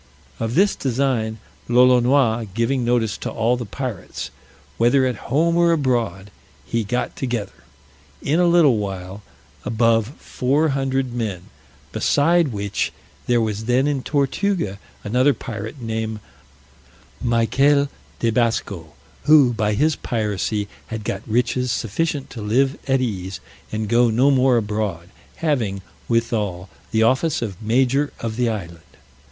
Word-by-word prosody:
Of 115 +1 -2
this 200 +3 +4
design 125 -4 -1 0.3
Lolonois 125 -1 +4
giving 120 +3 +1
notice 120 -3 0
to - - -4
all 115 +2 +1
the 120 -3 -5
pirates, 125 -4 -5 0.5
whether 120 +3 +4
at 125 -1 -4
home 165 +6 +2
or 170 0 +4
abroad, 120 -10 0 0.3
he 115 -1 -1
got 120 +5 -2
together, 120 -6 -3 0.7
in 150 - 0
a 175 - +4
little 165 -8 +5
while, 95 -1 -5 0.4
above 115 -1 +2
four 145 +5 0
hundred 135 -2 -1
men; 105 -7 -4 0.4
beside 165 +3 +3
which, 100 -4 -2 0.4
there 120 -1 +3
was 110 -1 -2
then 125 +3 +2
in 145 -2 0
Tortuga 140 - -1 0.2
another 125 +6 +2
pirate, 110 +2 -7
named 110 -2 -3 1.0
Michael 135 +5 +3 0.3
de 115 - +1
Basco, 110 -9 -1 0.3
who, 145 -5 +6
by 105 -2 0
his 155 +5 +2
piracy, 105 -2 -2 0.2
had 110 -1 -5
got 100 -1 -3
riches 125 +2 0
sufficient 140 +6 -2
to 115 - -7
live 130 +7 +2
at 135 -1 +2
ease, 95 -6 -3 0.3
and 110 0 -2
go 120 +2 +4
no 125 +6 +3
more 130 -2 +4
abroad; 105 -5 -2 0.3
having, 115 -12 -1 0.3
withal, 105 -6 -1 0.2
the 110 0 +2
office 130 +4 +2
of 100 -4 -6
major 130 +6 +2
of 115 -1 -4
the 120 0 +1
island. 85 -7 -5
120 Hz, 135 wpm, -21 LUFS, 110-135 Hz, 1.0 s, who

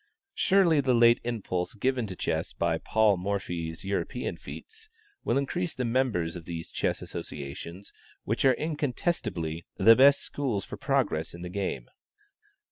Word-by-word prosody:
Surely 180 -6 +4
the 130 -2 +2
late 120 0 +6
impulse 105 -6 -3
given 125 +1 0
to 95 - -6
chess - - -2
by 80 -1 0
Paul 110 -3 +3
Morphy's 90 -4 -3
European 100 +5 -2
feats, 445 0 -10 0.3
will - - +1
increase 160 +5 -1
the 125 - -1
members 115 -9 0
of 85 -2 -8
these 80 -1 -6
chess - - -1
associations, 80 +7 -7 0.3
which 115 - -1
are 130 -2 +5
incontestably 125 - -2
the 115 +1 +7
best 140 +3 +6
schools 125 -9 -2
for - - -7
progress 130 - 0
in 85 - -9
the 90 - -5
game. 90 -10 -3
110 Hz, 145 wpm, -28 LUFS, 85-135 Hz, 0.3 s, the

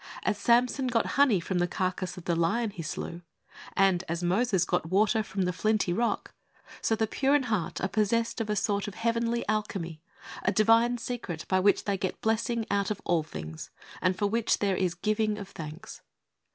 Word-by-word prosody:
As - - +1
Samson 245 +4 +3
got 235 -2 +1
honey 275 -9 +4
from 180 +1 -2
the 175 - +2
carcase 185 +1 -2
of 180 - -9
the 170 - +1
lion 210 +7 +1
he 180 - -7
slew, 170 +2 -5 0.6
and 190 -2 +4
as 170 +1 -2
Moses 190 +1 +2
got 160 - -1
water 215 +4 +3
from 195 -2 -2
the 180 0 0
flinty 210 -1 +1
rock, 235 +4 -1 0.5
so 225 - +2
the 220 0 +1
pure 270 +6 +2
in 290 - +3
heart 215 -8 -2
are 190 - 0
possessed 225 +4 0
of 215 - -3
a 210 - +1
sort 200 0 0
of 205 - -7
heavenly 230 +1 0
alchemy, 190 -7 -2 0.4
a 190 - +1
divine 230 +3 +4
secret 230 -9 -5
by 185 - +2
which 200 +2 +3
they 200 -2 -1
get 185 - -3
blessing 225 +1 0
out 200 -1 +1
of 210 -2 -2
all 170 -2 +2
things, 80 - -8 0.3
and 185 0 +1
for 205 - 0
which 225 +2 +1
there 200 -2 +1
is 180 -2 0
giving 215 +3 0
of 200 -2 -7
thanks. 155 -1 -9
205 Hz, 195 wpm, -28 LUFS, 180-230 Hz, 0.6 s, honey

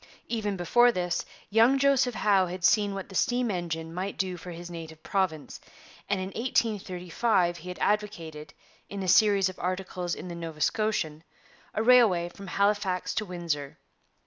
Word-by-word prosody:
Even 210 -4 -2
before 240 +8 +4
this, 180 -4 -2 0.2
young 230 +5 +5
Joseph 270 -3 +3
Howe 195 -4 +3
had 180 +1 -3
seen 205 0 +3
what 195 - -6
the - - -11
steam 245 +4 +1
engine 165 -3 -4
might 190 +3 -4
do 185 -2 -1
for 180 +1 -10
his 175 0 -8
native 160 -2 -9
province, 180 -7 -2 0.5
and 200 -1 +1
in 185 0 -3
1835 195 -4 0
he 175 +3 -9
had 180 - -6
advocated, 165 -8 -2 0.4
in 200 -1 -5
a - - -3
series 200 0 +5
of 185 - -7
articles 180 -1 -3
in - - -8
the 175 - -6
Nova 165 -2 -7
Scotian, 160 -6 0 0.5
a 220 - +1
railway 220 -8 +5
from 195 +2 -11
Halifax 195 -2 0
to 215 - -1
Windsor. 165 -6 -4
185 Hz, 165 wpm, -28 LUFS, 175-210 Hz, 0.5 s, young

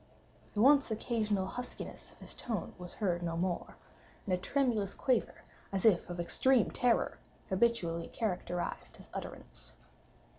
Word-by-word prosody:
The 205 - +2
once 280 0 +6
occasional 215 -3 0
huskiness 245 +6 -6
of - - -19
his - - -7
tone 225 -7 -3
was 180 -1 -7
heard 180 -5 0
no 165 -1 -2
more; 175 0 -1 0.5
and 190 - 0
a - - +3
tremulous 225 -3 +1
quaver, 255 -4 0 0.3
as 195 0 -1
if 195 -6 +5
of 175 0 -5
extreme 240 +8 +3
terror, 245 -2 +2 0.3
habitually 190 -5 +1
characterized 180 -5 -3
his - - -14
utterance. - - -7
200 Hz, 140 wpm, -33 LUFS, 175-235 Hz, 0.5 s, once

